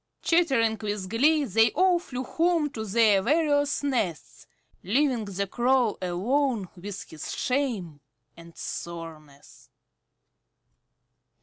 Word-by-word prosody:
Chattering 265 -10 +2
with 205 -3 -3
glee 295 +6 +3
they 225 +1 +3
all 365 +1 +3
flew 255 -7 -6
home 330 0 +1
to 220 -5 -5
their 215 -1 +3
various 290 +3 +1
nests, 225 - -3 0.3
leaving 245 +2 +1
the 200 0 -3
Crow 240 +1 +1
alone 215 +5 0
with 195 +2 -7
his 155 - -7
shame 230 - -2 0.4
and 170 0 -15
soreness. 155 -4 -9
230 Hz, 105 wpm, -26 LUFS, 190-285 Hz, 0.4 s, glee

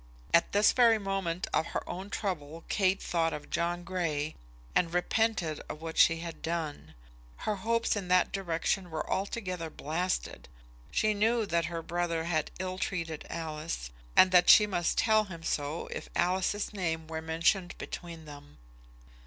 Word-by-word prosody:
At 170 - +4
this 205 +1 +5
very 235 -3 +5
moment 195 -4 -2
of 160 - +2
her - - -4
own 190 +3 -6
trouble 165 -6 -4
Kate 195 -1 +2
thought 165 -2 0
of 150 - -7
John 175 +1 -1
Grey, 165 -5 -2 0.4
and 170 -2 +2
repented 180 -2 0
of 150 - -6
what 165 0 -6
she 165 -1 +5
had 170 -1 -7
done. 155 - -4 0.5
Her 210 -1 0
hopes 230 +4 +1
in 200 -3 -3
that 180 0 +3
direction 180 0 -1
were 160 -1 -4
altogether 185 -4 -2
blasted. 165 - -3 0.4
She 215 0 +2
knew 225 +2 +2
that 170 -4 +1
her 165 0 -4
brother 170 -1 -1
had 160 -2 0
ill 185 0 -4
treated 165 -5 -3
Alice, 155 - -4 0.2
and 185 - +7
that 180 -1 +6
she 210 - +9
must 175 -5 0
tell 215 -1 +4
him 170 -4 -9
so 150 +1 -2
if - - -6
Alice's 185 +4 0
name 165 -5 -2
were 160 0 -5
mentioned 170 +3 +1
between 165 -2 -7
them. 145 -1 -12
175 Hz, 160 wpm, -30 LUFS, 160-195 Hz, 0.5 s, she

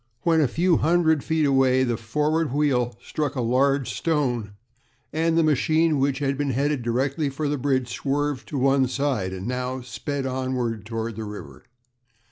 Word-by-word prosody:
When 165 -2 +3
a 145 - +3
few 170 +6 +2
hundred 160 -2 +2
feet 160 -1 +1
away 135 -2 +3
the 120 -2 0
forward 150 +7 0
wheel 130 -4 +1
struck 150 -2 -3
a 130 - -1
large 135 +3 +1
stone, 125 -10 -1 0.6
and 165 +1 +1
the 165 - +4
machine, 155 +1 +2
which 135 0 +1
had 140 -1 -1
been 145 -1 0
headed 140 +2 0
directly 135 +5 0
for 145 +2 -3
the 145 -1 -1
bridge, 130 -2 0
swerved 145 +1 -2
to 145 - -4
one 135 0 +3
side, 130 -7 -1
and 95 0 -6
now 125 +1 -3
sped 130 +4 -4
onward 130 -5 -2
toward 115 -1 -4
the 110 - -4
river. 105 -1 -9
135 Hz, 170 wpm, -24 LUFS, 125-150 Hz, 0.6 s, the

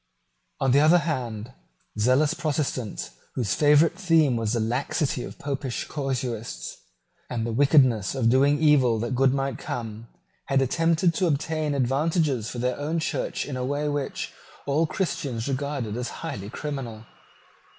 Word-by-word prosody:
On 135 - +2
the 140 - +5
other 155 +4 +6
hand, 125 -8 -3 0.5
zealous 130 +8 +3
Protestants, 145 -8 -2 0.2
whose 110 -7 0
favourite 150 - +5
theme 165 - +3
was 115 -1 -1
the 120 - +1
laxity 125 +4 -1
of - - -8
Popish 135 -3 -3
casuists 125 - -4 0.5
and 115 -2 -2
the 115 - -2
wickedness 130 -4 +4
of 125 -4 +1
doing 140 +4 +4
evil 140 -7 +4
that 115 +3 -2
good 130 +1 +3
might 135 -2 -2
come, 115 -1 -5 0.4
had 135 -1 +2
attempted 165 +5 +2
to 180 +2 +1
obtain 155 0 -1
advantages 140 - +1
for - - -6
their 125 +2 -1
own 155 +3 -1
Church 160 - -2
in 140 - -5
a 125 - -2
way 145 +3 -1
which 145 -2 -3 0.3
all 150 +3 +2
Christians 145 -8 -2
regarded 135 -5 -2
as 125 0 -3
highly 135 -12 -6
criminal. 120 -5 -5
135 Hz, 150 wpm, -25 LUFS, 120-150 Hz, 0.5 s, other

